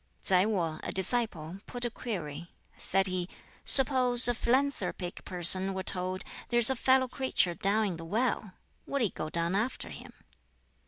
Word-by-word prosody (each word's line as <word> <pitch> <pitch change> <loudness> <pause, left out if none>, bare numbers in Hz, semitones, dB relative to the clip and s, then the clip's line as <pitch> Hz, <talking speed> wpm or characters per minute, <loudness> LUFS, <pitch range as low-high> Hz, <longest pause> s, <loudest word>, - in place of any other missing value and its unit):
Tsai 185 +1 0
Wo, 170 -7 -4
a - - -7
disciple, 190 -4 -4
put 245 0 -4
a 240 - -5
query. 175 - -9 0.2
Said 195 0 -3
he, 185 -1 -4 0.3
"Suppose 255 -3 +8
a 245 - 0
philanthropic 245 -7 -4
person 185 +1 +2
were 190 - -6
told, 185 +1 -3 0.3
'There's 240 +1 +6
a - - -3
fellow 260 +1 0
creature 255 -9 -3
down 205 +5 -2
in 195 - -4
the 165 - -11
well!' 215 0 -4 0.3
Would 280 -3 -3
he 210 - -2
go 155 - -8
down 170 +2 -4
after 220 +6 -5
him?" - - -13
195 Hz, 160 wpm, -27 LUFS, 180-245 Hz, 0.3 s, Suppose